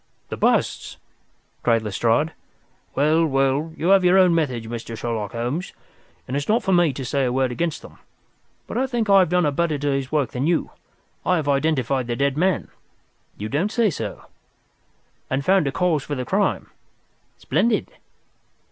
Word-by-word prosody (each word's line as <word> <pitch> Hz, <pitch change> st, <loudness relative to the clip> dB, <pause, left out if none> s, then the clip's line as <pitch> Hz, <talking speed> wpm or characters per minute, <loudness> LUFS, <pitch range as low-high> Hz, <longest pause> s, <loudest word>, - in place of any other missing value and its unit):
"The -, -, -4 dB
busts," -, -, 0 dB, 0.6 s
cried 115 Hz, -2 st, +2 dB
Lestrade. 115 Hz, +9 st, +1 dB, 0.6 s
"Well, 155 Hz, +4 st, +3 dB
well, 135 Hz, +1 st, +1 dB
you 170 Hz, -, 0 dB
have 195 Hz, -1 st, +6 dB
your 180 Hz, +1 st, +5 dB
own 185 Hz, -2 st, +5 dB
methods, 130 Hz, -9 st, -1 dB
Mr. 115 Hz, 0 st, -6 dB
Sherlock 110 Hz, -4 st, -3 dB
Holmes, 125 Hz, +9 st, -3 dB, 0.5 s
and 130 Hz, -, -3 dB
it -, -, +1 dB
is 145 Hz, -, -8 dB
not 230 Hz, +2 st, +2 dB
for 190 Hz, -, +1 dB
me 175 Hz, -4 st, +4 dB
to 130 Hz, 0 st, -6 dB
say 140 Hz, +2 st, 0 dB
a 125 Hz, -, +1 dB
word 130 Hz, 0 st, +1 dB
against 165 Hz, +5 st, -2 dB
them, -, -, -14 dB, 0.7 s
but -, -, -3 dB
I 265 Hz, -, +1 dB
think 235 Hz, -5 st, -1 dB
I 195 Hz, -, +8 dB
have 185 Hz, -, +3 dB
done 180 Hz, -1 st, +2 dB
a 145 Hz, -, +2 dB
better 155 Hz, +1 st, 0 dB
day's 140 Hz, -2 st, -2 dB
work 145 Hz, -6 st, 0 dB
than 130 Hz, +4 st, -1 dB
you. 170 Hz, -1 st, 0 dB, 0.5 s
I 180 Hz, -, +2 dB
have 155 Hz, -4 st, -2 dB
identified 135 Hz, -3 st, +1 dB
the 120 Hz, -, -2 dB
dead 140 Hz, +2 st, 0 dB
man." 185 Hz, +4 st, 0 dB, 0.7 s
"You 105 Hz, -, -4 dB
don't 155 Hz, -, -1 dB
say 230 Hz, -5 st, +2 dB
so?" 110 Hz, -8 st, -6 dB, 1.0 s
"And 135 Hz, +1 st, -1 dB
found 190 Hz, -5 st, +3 dB
a -, -, 0 dB
cause 170 Hz, -2 st, +1 dB
for 145 Hz, -, -4 dB
the 125 Hz, -1 st, -4 dB
crime." 200 Hz, +6 st, 0 dB, 0.7 s
"Splendid!" 230 Hz, -1 st, 0 dB
145 Hz, 180 wpm, -22 LUFS, 130-180 Hz, 1.0 s, I